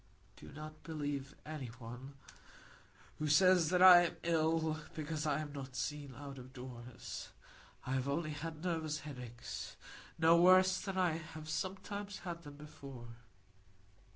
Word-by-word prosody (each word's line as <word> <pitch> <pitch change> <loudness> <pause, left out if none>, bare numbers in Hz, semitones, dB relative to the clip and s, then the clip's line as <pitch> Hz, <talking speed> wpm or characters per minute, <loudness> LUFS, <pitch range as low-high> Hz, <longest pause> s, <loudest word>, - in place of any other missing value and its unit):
"Do - - -12
not 155 +1 -9
believe 145 -3 -4
any 150 -4 -5
one 120 +3 -9 1.0
who 155 - 0
says 175 +2 +5
I 180 -1 +10
am - - -8
ill, 160 -1 +2 0.2
because 155 0 -2
I 150 0 +1
am 145 -2 -6
not 135 -2 -7
seen 145 -2 -3
out 140 0 -8
of 130 +1 -11
doors. 125 -2 -8 0.6
I 130 - -3
have 130 0 0
only 155 +2 -1
had 155 +2 -6
nervous 160 -4 -1
headaches,—no 145 +5 -1
worse 185 +1 +6
than 195 -2 -4
I 175 -4 +2
have 160 -1 -9
sometimes 195 +4 -4
had 170 -1 -4
them 145 -3 -11
before. 135 -5 -10
155 Hz, 135 wpm, -36 LUFS, 140-170 Hz, 1.0 s, I